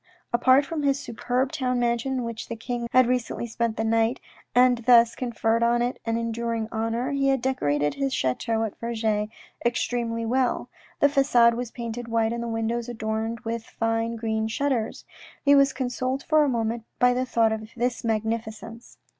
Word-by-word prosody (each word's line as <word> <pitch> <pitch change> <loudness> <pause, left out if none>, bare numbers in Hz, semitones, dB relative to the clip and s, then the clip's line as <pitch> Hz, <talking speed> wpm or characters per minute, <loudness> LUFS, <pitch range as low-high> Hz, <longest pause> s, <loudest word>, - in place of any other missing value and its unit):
Apart 260 +3 +5
from 315 +1 -3
his 280 -1 +1
superb 255 +1 -2
town 255 -5 -1
mansion 235 +2 0
in 255 -2 -1
which 230 -1 -5
the 230 - -5
king 240 +1 -4
of - - -6
had 255 0 +6
recently 245 -1 -1
spent 230 -1 -2
the 225 - 0
night, 225 +2 +1 0.4
and 250 -1 +5
thus 235 -1 +5
conferred 230 -2 0
on 240 +1 +3
it 245 +1 -2
an 230 0 +1
enduring 230 -1 -2
honour, 230 +4 -1
he 275 -1 +1
had 270 -1 +3
decorated 145 - 0
his 275 -1 -1
chateau 225 - 0
at 220 - -4
Vergy 220 -2 -1 0.3
extremely 235 -1 -1
well. 250 +2 0 0.3
The 285 - +6
facade 245 -4 +4
was 240 0 -4
painted 235 0 -6
white 230 0 +1
and 235 - -3
the 235 - -3
windows 230 +1 -2
adorned 225 0 -3
with 230 +1 -3
fine 225 +1 -1
green 220 -1 -1
shutters. 245 -1 -2 0.4
He 285 - +6
was 275 -1 +5
consoled 255 +1 -2
for 310 -1 +4
a 290 - +1
moment 230 -1 -1
by 250 0 +4
the 255 +1 -1
thought 225 -2 +2
of 220 0 -4
this 245 0 -1
magnificence. 225 +1 -3
235 Hz, 180 wpm, -25 LUFS, 225-250 Hz, 0.4 s, had